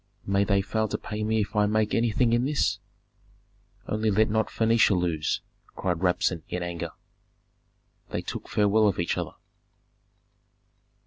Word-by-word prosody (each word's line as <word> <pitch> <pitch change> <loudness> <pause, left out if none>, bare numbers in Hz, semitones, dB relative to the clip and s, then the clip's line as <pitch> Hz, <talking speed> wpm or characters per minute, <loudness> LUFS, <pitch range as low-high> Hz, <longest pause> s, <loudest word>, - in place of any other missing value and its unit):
"May 100 0 +2
they 100 -1 +2
fail 110 +3 -1
to - - -2
pay 105 0 -5
me 110 0 +1
if 105 - -4
I 105 0 +3
make 110 0 +1
anything 115 +1 +2
in 120 +1 +3
this! 140 +2 +1 1.1
Only 110 +1 0
let 105 +1 +3
not 110 0 +1
Phœnicia 115 -4 +3
lose!" 80 -3 -1 0.3
cried 90 -3 -1
Rabsun, 90 -1 +1
in 90 0 -3
anger. 85 -1 -5 1.2
They - - -3
took - - -6
farewell 105 +1 +3
of 100 - +1
each 85 - 0
other. - - -4
105 Hz, 145 wpm, -26 LUFS, 95-110 Hz, 1.2 s, I